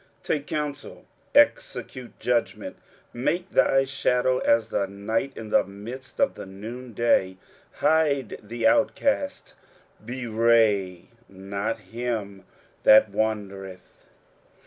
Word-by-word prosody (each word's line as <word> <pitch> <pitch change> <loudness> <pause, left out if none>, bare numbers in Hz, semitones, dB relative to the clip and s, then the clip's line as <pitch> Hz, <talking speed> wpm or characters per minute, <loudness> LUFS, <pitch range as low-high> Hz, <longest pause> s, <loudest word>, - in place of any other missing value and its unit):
23:016:003 - - -35
Take 145 -2 -2
counsel, 150 -2 -5 0.3
execute 125 -2 +1
judgment; 120 -1 -1 0.4
make 175 +10 -2
thy 135 0 +4
shadow 130 -1 +1
as 115 -1 +2
the 100 - -1
night 110 +7 -2
in 110 -1 -8
the - - +4
midst 115 +7 -10
of 275 - +3
the - - -9
noonday; 110 -1 -1 0.4
hide 145 -7 +1
the 115 +3 -4
outcasts; 285 -1 +1 0.5
bewray 110 -6 +1 0.3
not 100 +3 -4
him 105 -2 -5 0.4
that 110 -1 +6
wandereth. 100 -4 -4
115 Hz, 100 wpm, -25 LUFS, 100-130 Hz, 0.5 s, that